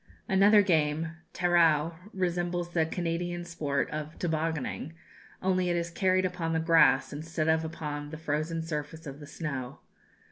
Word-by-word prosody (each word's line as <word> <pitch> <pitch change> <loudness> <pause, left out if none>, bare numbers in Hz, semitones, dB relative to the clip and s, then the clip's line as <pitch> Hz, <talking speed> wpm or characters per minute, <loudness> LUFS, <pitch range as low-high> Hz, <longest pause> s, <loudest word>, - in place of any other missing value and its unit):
Another 200 +2 +6
game, 160 -3 +1 0.2
tarua, 170 -3 +3 0.2
resembles 175 -1 -1
the 165 -2 +1
Canadian 175 +1 -2
sport 145 -5 -1
of 155 +1 -5
"tobogonning," 160 -2 -2 0.5
only 185 -1 +2
it 175 - +1
is 170 0 -2
carried 185 +1 +2
on 185 - 0
upon 165 -3 -2
the 160 - +2
grass 160 -5 +4
instead 155 +1 -3
of 160 0 +3
upon 150 -2 -5
the 160 - -7
frozen 160 +1 -2
surface 160 0 -5
of 140 0 -7
the 145 - -10
snow. 140 -5 -5
165 Hz, 150 wpm, -29 LUFS, 155-175 Hz, 0.5 s, Another